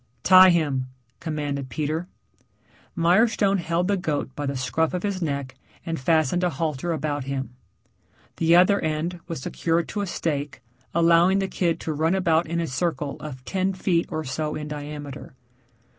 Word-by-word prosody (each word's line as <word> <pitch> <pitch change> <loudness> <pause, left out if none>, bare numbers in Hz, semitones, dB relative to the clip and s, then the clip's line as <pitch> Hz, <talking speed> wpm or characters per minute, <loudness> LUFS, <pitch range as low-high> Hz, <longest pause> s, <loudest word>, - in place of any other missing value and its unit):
"Tie 185 0 +8
him," 145 -7 +1 0.3
commanded 145 -4 -3
Peter. 155 +4 -2 0.9
Mirestone 195 +3 +3
held 170 +1 0
the 200 - +2
goat 145 -6 -3
by 145 -1 -3
the 140 -1 -2
scruff 160 +7 0
of 180 - -3
his 200 -2 -2
neck 140 -4 -2 0.3
and 165 -1 -3
fastened 160 +4 +2
a 180 - +3
halter 155 +1 -2
about 145 -3 -2
him. 135 -2 -4 0.8
The 165 +1 +4
other 185 +3 +5
end 160 +3 -2
was 165 -5 -5
secured 165 0 0
to 205 - -3
a 200 - -2
stake 145 -7 -3 0.3
allowing 170 +3 +4
the 195 -1 0
kid 175 -3 0
to 160 - -2
run 160 +4 +1
about 170 -3 +2
in 170 +1 -2
a 170 - 0
circle 145 0 -2
of 130 -4 -8
ten 190 0 0
feet 180 -2 0
or 155 -2 -3
so 150 +3 -3
in 150 0 -5
diameter. 145 -1 -7
160 Hz, 165 wpm, -24 LUFS, 145-175 Hz, 0.9 s, Tie